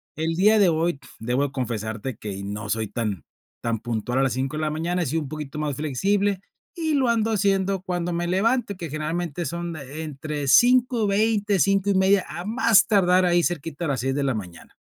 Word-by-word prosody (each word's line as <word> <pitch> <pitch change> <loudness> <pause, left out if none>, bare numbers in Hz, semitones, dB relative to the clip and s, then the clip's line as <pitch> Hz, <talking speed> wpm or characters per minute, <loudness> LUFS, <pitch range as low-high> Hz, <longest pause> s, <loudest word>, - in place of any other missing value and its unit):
El 160 +2 -1
día 210 +4 +4
de 190 -3 +5
hoy 160 -2 0 0.2
debo 130 +5 -1
confesarte 115 -2 -4
que 100 -2 -6
no 105 +2 -5
soy 110 -1 -1
tan 105 - -3 0.4
tan 115 -2 -1
puntual 120 +2 -2
a - - +3
las 130 -4 +1
5 135 +3 -2
de - - -2
la 155 - 0
mañana, 170 +4 -1
he - - 0
sido 160 +3 -1
un 135 - -8
poquito 150 -1 -6
más 150 -3 -2
flexible, 195 +7 0 0.4
y 320 -2 -1
lo 265 -3 +2
ando 225 -1 +1
haciendo 195 -2 +1
cuando 175 -2 -2
me 175 0 -1
levante, 205 +2 +1
que 165 -4 -6
generalmente 160 +1 -3
son 170 +2 -4
entre 150 0 -5
5:20, 220 - +3
5:30, 195 0 +3
a 175 +2 -6
más 225 -1 +4
tardar 185 -3 +3
ahí 175 0 +3
cerquita 165 0 -3
a - - -1
las 135 -4 -1
6 135 +1 -1
de 140 0 -1
la 135 -4 0
mañana. 90 -6 -9
165 Hz, 195 wpm, -24 LUFS, 135-195 Hz, 0.4 s, de